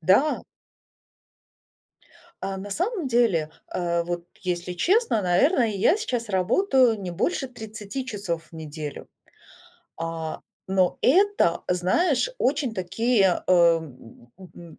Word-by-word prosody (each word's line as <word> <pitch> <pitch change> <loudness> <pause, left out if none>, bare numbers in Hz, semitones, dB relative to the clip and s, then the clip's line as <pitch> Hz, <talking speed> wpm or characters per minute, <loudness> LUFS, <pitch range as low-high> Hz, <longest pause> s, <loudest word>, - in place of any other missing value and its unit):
Да. 200 - +3 2.0
А 195 0 -3
на 195 +2 -7
самом 360 - -2
деле, 220 -11 +2 0.2
а, 170 -1 -1
вот, 175 0 -4 0.2
если 180 -1 -3
честно, 350 - +2
наверное, 235 - +3
я 210 - +2
сейчас 245 - -3
работаю 230 - +2
не 185 -2 -5
больше 265 - -1
30 220 +1 -7
часов 195 -8 -4
в - - -45
неделю. 155 -2 -7 0.9
А, 165 -1 -4 0.3
но 190 -1 +1
это, 375 - +3
знаешь, 245 - +2
очень 270 - 0
такие, 190 +1 +1
э, - - +3
м, 160 -9 +1
м, 175 -3 -13
195 Hz, 115 wpm, -25 LUFS, 175-255 Hz, 2.0 s, Да